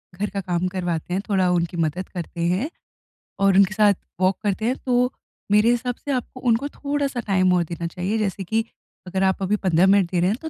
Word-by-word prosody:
घर 205 Hz, +3 st, -2 dB
का 200 Hz, -1 st, -3 dB
काम 180 Hz, -1 st, -1 dB
करवाते 180 Hz, -2 st, -3 dB
हैं, 190 Hz, -, 0 dB
थोड़ा 190 Hz, -3 st, +2 dB
उनकी 170 Hz, -1 st, 0 dB
मदद 165 Hz, +3 st, -1 dB
करते 170 Hz, -1 st, -6 dB
हैं 190 Hz, -, 0 dB, 0.7 s
और 195 Hz, -1 st, +4 dB
उनके 195 Hz, +1 st, +5 dB
साथ 210 Hz, -1 st, +5 dB, 0.3 s
वॉक 185 Hz, +1 st, +3 dB
करते 205 Hz, +1 st, -1 dB
हैं, 250 Hz, +3 st, +1 dB
तो 250 Hz, 0 st, +2 dB, 0.4 s
मेरे 210 Hz, +2 st, +5 dB
हिसाब 245 Hz, 0 st, -1 dB
से 285 Hz, -, -3 dB
आपको 255 Hz, 0 st, -3 dB
उनको 230 Hz, +5 st, +2 dB
थोड़ा-सा 280 Hz, -3 st, -2 dB
टाइम 185 Hz, -2 st, +3 dB
और 175 Hz, -1 st, +3 dB
देना 170 Hz, 0 st, -3 dB
चाहिए। 185 Hz, +6 st, -2 dB
जैसे 200 Hz, -2 st, -2 dB
कि 220 Hz, +5 st, 0 dB, 0.4 s
अगर 190 Hz, +1 st, -1 dB
आप 190 Hz, 0 st, +1 dB
अभी 195 Hz, +2 st, +1 dB
15 185 Hz, -2 st, +3 dB
मिनट 195 Hz, -3 st, +4 dB
दे 180 Hz, -, +1 dB
रहे 180 Hz, +2 st, +3 dB
हैं, 215 Hz, -, 0 dB
तो 320 Hz, -, -5 dB
195 Hz, 215 wpm, -23 LUFS, 180-225 Hz, 0.7 s, उनके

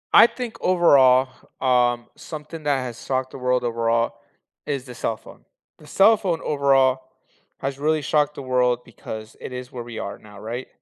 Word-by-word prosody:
I 230 Hz, -, +10 dB
think 245 Hz, -3 st, -6 dB
overall, 135 Hz, -8 st, +5 dB, 0.3 s
um, 125 Hz, -2 st, +2 dB
something 155 Hz, 0 st, -9 dB
that 145 Hz, -2 st, +1 dB
has 120 Hz, -3 st, -7 dB
shocked 130 Hz, -1 st, -2 dB
the -, -, -9 dB
world 125 Hz, 0 st, +1 dB
overall 115 Hz, 0 st, 0 dB, 0.5 s
is 140 Hz, -3 st, -2 dB
the 125 Hz, -2 st, -10 dB
cell 115 Hz, -2 st, -2 dB
phone. -, -, -16 dB, 0.4 s
The 150 Hz, -, -16 dB
cell 210 Hz, +6 st, +5 dB
phone 180 Hz, -5 st, -1 dB
overall 135 Hz, -3 st, +3 dB, 0.6 s
has 135 Hz, 0 st, -4 dB
really 155 Hz, 0 st, +1 dB
shocked 150 Hz, -1 st, +1 dB
the 140 Hz, -, -7 dB
world 125 Hz, -1 st, +2 dB
because 110 Hz, -2 st, -9 dB
it -, -, -7 dB
is 125 Hz, 0 st, -7 dB
where 120 Hz, -2 st, -6 dB
we 115 Hz, -1 st, -9 dB
are 100 Hz, -, -5 dB
now. 105 Hz, -1 st, -14 dB
Right? 120 Hz, +5 st, -5 dB
130 Hz, 180 wpm, -23 LUFS, 120-150 Hz, 0.6 s, I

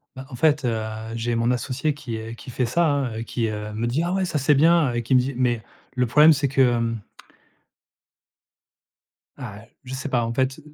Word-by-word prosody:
Bah, 130 Hz, 0 st, -9 dB
en 125 Hz, -, -8 dB
fait, 150 Hz, +2 st, +2 dB
heu, 115 Hz, -3 st, 0 dB, 0.4 s
j'ai 115 Hz, +1 st, -2 dB
mon 115 Hz, +1 st, +1 dB
associé 135 Hz, +4 st, -1 dB
qui 120 Hz, -6 st, -6 dB
est 115 Hz, +1 st, -7 dB
qui 125 Hz, -, -10 dB
fait 125 Hz, 0 st, -1 dB
ça, 170 Hz, +7 st, +2 dB
hein, 140 Hz, -5 st, 0 dB
heu, -, -, -3 dB
qui, 115 Hz, -1 st, -2 dB
heu, 105 Hz, 0 st, -5 dB
me 115 Hz, +2 st, -2 dB
dit: 140 Hz, +8 st, 0 dB
«Ah 175 Hz, +1 st, -1 dB
ouais, 190 Hz, 0 st, +1 dB
ça 170 Hz, -4 st, -2 dB
c'est 145 Hz, +2 st, +3 dB
bien» 155 Hz, -2 st, +4 dB
et 120 Hz, -, -1 dB
qui 125 Hz, +3 st, +1 dB
me 125 Hz, -, +7 dB
dit 130 Hz, +2 st, -1 dB
mais 120 Hz, -3 st, 0 dB, 0.3 s
le 125 Hz, 0 st, +2 dB
problème, 150 Hz, +6 st, +6 dB
c'est 140 Hz, 0 st, 0 dB
que, 135 Hz, 0 st, +1 dB
hem 115 Hz, -1 st, -1 dB, 2.4 s
ah, 110 Hz, -6 st, -8 dB
heu, -, -, -13 dB, 0.2 s
je 130 Hz, +1 st, -8 dB
sais 130 Hz, +2 st, -4 dB
pas 120 Hz, -2 st, +1 dB
en 115 Hz, -, -3 dB
fait, 130 Hz, +3 st, 0 dB
125 Hz, 225 wpm, -23 LUFS, 115-145 Hz, 2.4 s, me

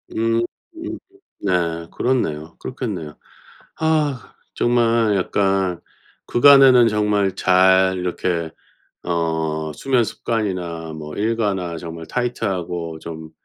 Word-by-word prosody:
음 115 Hz, +1 st, +1 dB, 1.0 s
네. 85 Hz, -3 st, 0 dB
그렇네요. 85 Hz, -11 st, -1 dB
그렇겠네요. 100 Hz, -, -5 dB, 0.7 s
아 150 Hz, -5 st, 0 dB, 0.2 s
정말 115 Hz, -3 st, +2 dB
약간 95 Hz, -2 st, 0 dB, 0.5 s
그간에는 130 Hz, -2 st, +7 dB
정말 105 Hz, -2 st, +1 dB
잘 95 Hz, 0 st, +4 dB
이렇게 90 Hz, -2 st, -2 dB, 0.5 s
어 80 Hz, -2 st, -1 dB
수면 130 Hz, -4 st, +1 dB
습관이나 90 Hz, -8 st, -3 dB
뭐 75 Hz, -1 st, -8 dB
일과나 100 Hz, -6 st, -1 dB
정말 80 Hz, -1 st, -8 dB
타이트하고 90 Hz, -9 st, -3 dB
좀 80 Hz, -1 st, -8 dB
95 Hz, 200 characters per minute, -21 LUFS, 85-115 Hz, 1.0 s, 그간에는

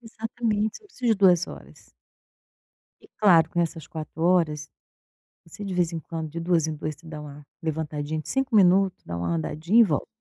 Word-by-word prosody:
Exatamente, 220 Hz, -2 st, -2 dB
você -, -, -32 dB
não -, -, -18 dB
precisa 250 Hz, -9 st, -3 dB
de 205 Hz, -, -2 dB
2 180 Hz, -3 st, +5 dB
horas. -, -, -13 dB, 1.1 s
E -, -, -18 dB
claro 170 Hz, -6 st, +6 dB
que 175 Hz, -, -4 dB
nessas 165 Hz, -2 st, -1 dB
4 160 Hz, 0 st, -7 dB
horas, 160 Hz, -4 st, +2 dB, 0.8 s
você 200 Hz, +5 st, -10 dB
de 195 Hz, -2 st, -4 dB
vez 175 Hz, -2 st, +1 dB
em 165 Hz, -, -3 dB
quando, 160 Hz, 0 st, -6 dB
de 170 Hz, -, -6 dB
2 165 Hz, -2 st, +1 dB
em 155 Hz, -, -3 dB
2, 155 Hz, 0 st, -4 dB
você 165 Hz, +2 st, -17 dB
dá 155 Hz, -1 st, -7 dB
uma 145 Hz, 0 st, -11 dB, 0.2 s
levantadinha 155 Hz, -1 st, -3 dB
de -, -, -11 dB
5 270 Hz, -3 st, 0 dB
minutos, 190 Hz, -1 st, +4 dB
dá 85 Hz, 0 st, -5 dB
uma 85 Hz, 0 st, -2 dB
andadinha 155 Hz, -, +1 dB
e -, -, +9 dB
volta. -, -, 0 dB
165 Hz, 200 wpm, -25 LUFS, 155-195 Hz, 1.1 s, e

